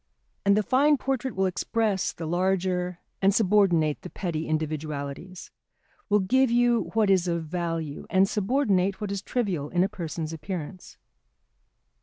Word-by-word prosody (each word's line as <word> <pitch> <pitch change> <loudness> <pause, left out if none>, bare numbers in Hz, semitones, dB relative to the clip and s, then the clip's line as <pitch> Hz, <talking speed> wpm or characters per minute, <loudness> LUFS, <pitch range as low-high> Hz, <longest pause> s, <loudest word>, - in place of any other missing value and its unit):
And 200 +1 +4
the 215 - +2
fine 285 +6 +3
portrait 265 -1 -2
will 190 0 +1
express 195 +1 0
the 165 - -7
larger 180 +1 0 0.2
and 195 0 +4
subordinate 185 -8 +3
the 180 - -8
petty 165 -5 -3
individualities, 155 +2 -4 0.6
will 210 0 +4
give 260 +7 +3
you 240 0 +2
what 215 -3 +3
is 185 -2 +3
of 170 -1 -1
value, 165 -3 -4
and 190 +1 +4
subordinate 200 -3 +1
what 210 -2 -4
is 200 -1 -3
trivial 190 - -2
in 180 0 +2
a - - +2
person's 165 -5 -5
appearance. 175 +2 -7
185 Hz, 145 wpm, -26 LUFS, 165-210 Hz, 0.6 s, And